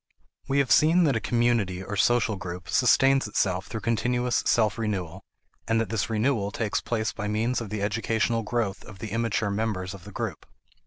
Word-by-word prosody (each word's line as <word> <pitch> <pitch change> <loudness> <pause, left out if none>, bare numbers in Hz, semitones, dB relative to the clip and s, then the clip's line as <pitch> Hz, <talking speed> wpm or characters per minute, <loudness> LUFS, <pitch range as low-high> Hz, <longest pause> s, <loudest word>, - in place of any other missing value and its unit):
We 135 - 0
have 140 -2 +2
seen 165 +4 +5
that 145 -6 +2
a - - +1
community 115 -7 0
or 105 - -5
social 115 +1 +2
group 90 -1 -7
sustains 135 0 +4
itself 95 -2 0
through 110 - -5
continuous 120 +2 0
self 110 -1 +2
renewal, 95 -5 -3 0.5
and 115 0 +2
that 115 - -1
this 105 -2 -1
renewal 110 -2 +1
takes 105 0 -2
place 110 -2 -2
by 105 - -4
means 115 +4 0
of 115 - -6
the 105 -1 -3
educational 110 +2 0
growth 110 -3 -2
of 105 - -12
the 110 - -6
immature 115 -2 0
members 100 -3 -2
of 95 -3 -11
the - - -10
group. - - -5
110 Hz, 190 wpm, -26 LUFS, 100-120 Hz, 0.5 s, seen